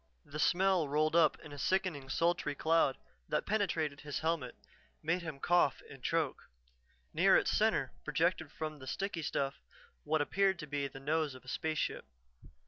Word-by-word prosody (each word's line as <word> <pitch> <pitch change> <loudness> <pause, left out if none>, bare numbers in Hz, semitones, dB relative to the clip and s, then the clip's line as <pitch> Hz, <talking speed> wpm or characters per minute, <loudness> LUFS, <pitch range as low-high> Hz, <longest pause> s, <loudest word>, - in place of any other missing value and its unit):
The 150 - -7
smell 180 +1 +3
rolled 155 +2 +2
up 160 -3 +5
in 150 - -10
a 145 - -8
sickening, 175 -8 0
sultry 165 -3 +1
cloud 160 -3 +2 0.3
that 150 - 0
penetrated 165 -9 0
his 145 -2 -4
helmet, 160 -6 -1 0.5
made 165 +3 +1
him 160 -5 -6
cough 175 -3 +3
and 135 -2 -11
choke. 165 -5 -1 0.6
Near - - +6
its - - +1
center - - +2
projected - - 0
from 155 -1 -5
the 130 - -10
sticky 195 +2 -3
stuff 140 -1 -2 0.4
what 155 +1 +1
appeared 190 +5 +2
to 165 - -6
be 145 -1 -2
the 135 - -10
nose 150 0 0
of 130 - -13
a - - -18
spaceship. 155 +4 -2
155 Hz, 165 wpm, -33 LUFS, 145-170 Hz, 0.6 s, Near